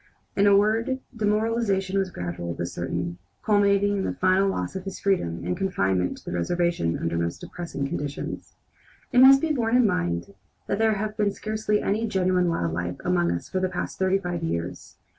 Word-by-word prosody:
In 200 +1 +4
a 200 -1 +7
word, 225 +5 +2 0.2
demoralization 210 -3 +1
was 190 -1 0
gradual 85 - -5
but 85 - -3
certain, 85 0 -4 0.3
culminating 205 -1 +3
in 195 - -1
the - - -2
final 185 +1 +3
loss 90 - -3
of 190 - -4
his 195 - -6
freedom 85 - 0
and 90 - -1
confinement 95 - 0
to - - -17
the - - -5
reservation 170 - 0
under 85 0 -2
most 85 0 -2
depressing 155 -5 -5
conditions. 145 0 -5 0.6
It 245 - +5
must 270 +1 +9
be 320 -1 +1
borne 235 -3 +1
in 250 -1 +5
mind 85 - -1 0.3
that 200 - -2
there 220 0 +3
has 210 +1 -3
been 210 -2 +1
scarcely 215 0 -1
any 220 +3 0
genuine 185 -3 +2
wild 85 - -1
life 90 +1 -3
among 85 -1 +2
us 85 0 -3
for 185 - -2
the 185 0 0
past 180 0 -4
thirty 190 0 +3
five 175 -3 -4
years. 85 - -4
185 Hz, 190 wpm, -25 LUFS, -, 0.6 s, must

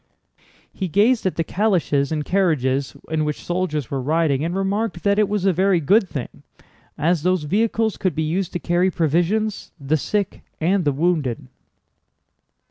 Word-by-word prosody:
He 190 - -3
gazed 210 +5 +3
at 185 - -2
the 165 - 0
calèches 170 -8 0
and 150 -2 -2
carriages 140 -8 0
in 155 -1 +1
which 150 -1 -4
soldiers 175 -7 -2
were 135 -1 -1
riding 150 0 +1
and 170 +2 -2
remarked 195 -1 -1
that 200 0 +2
it 210 -2 +2
was 205 -2 -1
a 190 - +4
very 185 +1 +2
good 190 +5 +3
thing, 135 -5 -6 0.6
as 165 +2 +1
those 180 -1 +1
vehicles 220 +6 0
could 185 - -1
be 160 - 0
used 175 +4 -1
to 175 - -2
carry 175 +2 +1
provisions, 175 +6 0
the 145 +3 0
sick, 200 +6 -2 0.2
and 180 +2 +1
the 145 - +3
wounded. 145 -4 0
175 Hz, 165 wpm, -21 LUFS, 150-195 Hz, 0.6 s, a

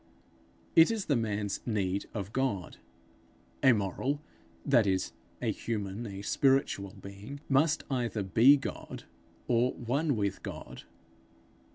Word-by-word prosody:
It 165 - +8
is 220 -4 -1
the 145 - +2
man's 105 -3 -1
need 100 -4 -1
of 100 -2 -5
God. 115 -10 -1 0.8
A 130 - +7
moral, 115 +7 0 0.5
that 120 -7 +4
is, 95 -1 0 0.3
a - - +2
human, 105 0 -4
a 100 0 -7
spiritual 130 -6 +1
being, 100 +8 -9
must 150 +3 +3
either 120 -5 -1
be 115 +9 +6
God, 135 - -6 0.4
or 120 +1 +2
one 140 +5 0
with 100 -2 -1
God. - - -8
115 Hz, 125 wpm, -30 LUFS, 100-135 Hz, 0.8 s, It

